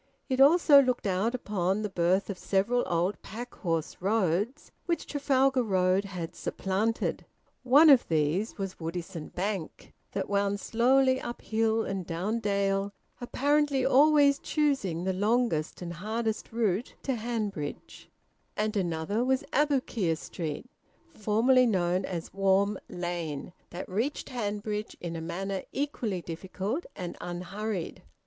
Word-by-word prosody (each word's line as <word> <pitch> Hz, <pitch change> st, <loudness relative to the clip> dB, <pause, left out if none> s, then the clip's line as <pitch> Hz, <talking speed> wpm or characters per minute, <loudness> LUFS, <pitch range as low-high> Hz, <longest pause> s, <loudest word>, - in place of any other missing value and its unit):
It 260 Hz, 0 st, +2 dB
also 290 Hz, -1 st, +7 dB
looked 255 Hz, -4 st, -1 dB
out 200 Hz, +5 st, +1 dB
upon 205 Hz, -3 st, -1 dB
the -, -, 0 dB
birth 185 Hz, +2 st, +1 dB
of 185 Hz, -, -8 dB
several 220 Hz, +6 st, +1 dB
old 175 Hz, +4 st, 0 dB
pack 240 Hz, +4 st, -8 dB
horse 165 Hz, -4 st, -2 dB
roads 205 Hz, -, 0 dB, 0.2 s
which 340 Hz, -2 st, -1 dB
Trafalgar 270 Hz, -2 st, +2 dB
Road 190 Hz, -2 st, +2 dB
had 180 Hz, -4 st, -6 dB
supplanted. 205 Hz, +4 st, -1 dB, 0.4 s
One 275 Hz, +6 st, +6 dB
of 275 Hz, -5 st, +7 dB
these 160 Hz, +6 st, 0 dB
was 195 Hz, -2 st, -5 dB
Woodisun 165 Hz, 0 st, -5 dB
Bank, 190 Hz, -3 st, -4 dB, 0.2 s
that 195 Hz, -, -2 dB
wound 200 Hz, 0 st, 0 dB
slowly 260 Hz, +4 st, +3 dB
up 240 Hz, -, -6 dB
hill 225 Hz, 0 st, +1 dB
and 195 Hz, -1 st, -3 dB
down 185 Hz, +7 st, -2 dB
dale, 200 Hz, -1 st, 0 dB, 0.3 s
apparently 285 Hz, +1 st, +1 dB
always 285 Hz, +1 st, +5 dB
choosing 270 Hz, -, 0 dB
the 190 Hz, 0 st, 0 dB
longest 205 Hz, -5 st, 0 dB
and 170 Hz, -1 st, -5 dB
hardest 220 Hz, +5 st, -3 dB
route, 225 Hz, -1 st, -1 dB
to 270 Hz, -, 0 dB
Hanbridge; 215 Hz, -10 st, -4 dB, 0.5 s
and 215 Hz, +1 st, 0 dB
another 180 Hz, +4 st, 0 dB
was 265 Hz, +1 st, +1 dB
Aboukir 255 Hz, -, +1 dB
Street, 155 Hz, +1 st, -5 dB, 0.5 s
formerly 240 Hz, +4 st, +3 dB
known 185 Hz, -3 st, +1 dB
as 170 Hz, -3 st, -5 dB
Warm 195 Hz, +1 st, +2 dB
Lane, 175 Hz, -3 st, -4 dB, 0.2 s
that 175 Hz, -, -6 dB
reached 225 Hz, +10 st, -2 dB
Hanbridge 210 Hz, -2 st, -3 dB
in 170 Hz, -1 st, -5 dB
a 165 Hz, -, -4 dB
manner 195 Hz, +4 st, -3 dB
equally 235 Hz, -, -2 dB
difficult 190 Hz, -, -4 dB
and 180 Hz, -3 st, -5 dB
unhurried. 180 Hz, +2 st, -4 dB
205 Hz, 130 wpm, -29 LUFS, 180-245 Hz, 0.5 s, also